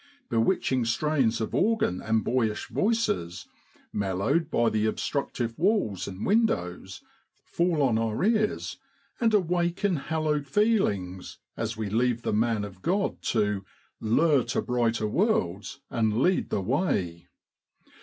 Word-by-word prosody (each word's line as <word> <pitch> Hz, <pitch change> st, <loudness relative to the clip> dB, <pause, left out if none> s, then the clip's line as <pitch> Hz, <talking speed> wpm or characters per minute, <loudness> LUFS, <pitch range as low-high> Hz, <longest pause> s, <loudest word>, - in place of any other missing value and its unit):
Bewitching 125 Hz, +1 st, +1 dB
strains 120 Hz, -1 st, +1 dB
of 110 Hz, -, -3 dB
organ 210 Hz, -, +1 dB
and 110 Hz, -1 st, +1 dB
boyish 115 Hz, -4 st, 0 dB
voices, 200 Hz, -, -1 dB, 0.5 s
mellowed 100 Hz, -, 0 dB
by 120 Hz, -6 st, +2 dB
the 110 Hz, 0 st, +1 dB
obstructive 120 Hz, -1 st, -2 dB
walls 180 Hz, -, +1 dB
and 95 Hz, +1 st, -5 dB
windows, 95 Hz, -, 0 dB, 0.4 s
fall 170 Hz, -4 st, +1 dB
on 115 Hz, -5 st, +2 dB
our 115 Hz, +3 st, -1 dB
ears, 215 Hz, 0 st, 0 dB, 0.4 s
and 230 Hz, -3 st, +3 dB
awaken 180 Hz, -1 st, +1 dB
hallowed 150 Hz, -1 st, -1 dB
feelings 105 Hz, -, 0 dB, 0.2 s
as 115 Hz, 0 st, -3 dB
we 110 Hz, -1 st, -2 dB
leave 120 Hz, +3 st, 0 dB
the -, -, -1 dB
man 110 Hz, 0 st, +1 dB
of 100 Hz, -2 st, -9 dB
Grod 195 Hz, +4 st, -1 dB
to 105 Hz, -3 st, 0 dB, 0.2 s
' -, -, -38 dB
lure 140 Hz, +4 st, +3 dB
to 120 Hz, -, -1 dB
brighter 115 Hz, -3 st, 0 dB
worlds 105 Hz, -, 0 dB
and 110 Hz, -2 st, +1 dB
lead 180 Hz, +9 st, +2 dB
the -, -, -1 dB
way.' 95 Hz, -, -1 dB
120 Hz, 130 wpm, -27 LUFS, 105-170 Hz, 0.5 s, and